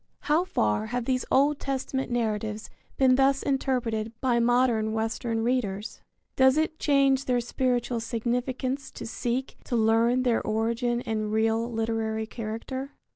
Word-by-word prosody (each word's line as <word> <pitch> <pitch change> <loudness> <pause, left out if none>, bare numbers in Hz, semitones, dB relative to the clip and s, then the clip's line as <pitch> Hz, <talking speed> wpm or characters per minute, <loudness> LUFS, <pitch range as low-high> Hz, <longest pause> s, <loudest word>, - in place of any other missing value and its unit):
How 310 +4 +2
far 110 - 0
have 245 +1 -2
these 255 0 0
Old 285 +2 +3
Testament 265 0 -2
narratives 220 -2 -2 0.3
been 255 -1 +4
thus 275 0 +3
interpreted 245 -5 -1
by 245 -3 +2
modern 235 -2 +2
western 225 +1 -1
readers? 220 -4 -2 0.3
Does 265 +1 +5
it 315 0 0
change 275 -2 +3
their 250 -1 +2
spiritual 245 0 -1
significance 250 +4 -2
to - - -8
seek 245 +3 -3
to 245 - -2
learn 230 +3 +3
their 240 -2 +2
origin 235 +2 0
and 215 -3 -2
real 225 +2 +1
literary 225 -1 -1
character? 230 +5 -5
240 Hz, 135 wpm, -27 LUFS, 225-260 Hz, 0.3 s, Does